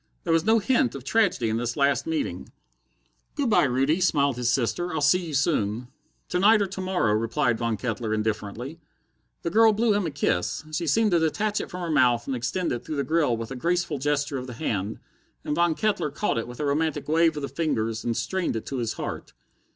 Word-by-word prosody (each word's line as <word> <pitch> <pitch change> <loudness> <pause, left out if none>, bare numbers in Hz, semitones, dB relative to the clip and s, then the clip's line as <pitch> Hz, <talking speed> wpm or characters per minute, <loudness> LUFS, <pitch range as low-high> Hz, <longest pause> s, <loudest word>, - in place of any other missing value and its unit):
There 165 - +1
was 165 - +3
no 220 +1 +5
hint 225 - +1
of 135 - -7
tragedy 180 - +2
in 110 0 0
this 120 +2 -3
last 140 - +2
meeting. 320 -3 -3 0.9
"Good 275 -6 0
by, - - +5
Rudy," 135 +7 +1
smiled 140 -6 +2
his 120 -1 0
sister, 140 +8 0
"I'll 160 - -1
see 170 +5 +3
you 155 - -4
soon." 120 -5 0 0.4
"To 180 - 0
night 215 +3 +6
or 200 - +2
to 190 0 -6
morrow," 185 - +1
replied 115 +1 0
Von 115 -2 -1
Kettler 115 -2 -3
indifferently. 110 +7 -3 0.6
The 170 - -2
girl 220 +2 +6
blew 220 +1 +2
him 205 -4 0
a - - -1
kiss. 140 - -1
She 165 +2 -2
seemed 220 +4 +3
to 170 - +4
detach 205 +7 0
it - - -7
from 180 -1 -6
her 170 -2 -2
mouth 125 -5 +3
and 135 - -2
extend 135 +9 -2
it 120 - -3
through 155 - -5
the 140 - 0
grill 155 -7 +1
with 115 +2 -6
a - - -4
graceful 170 +1 -1
gesture 145 0 -1
of 130 - -7
the 125 - -7
hand, 110 -6 -3 0.5
and 150 - -1
Von 170 -1 +2
Kettler 210 -7 0
caught 150 - -1
it 115 - -5
with 120 0 -10
a 150 - -1
romantic 155 +2 -1
wave 160 +1 +3
of 145 - -4
the - - -1
fingers 115 -10 -2
and 115 -1 -1
strained 190 -9 -1
it 110 - -4
to 135 - -4
his 115 -3 -2
heart. - - -6
145 Hz, 225 wpm, -25 LUFS, 120-180 Hz, 0.9 s, night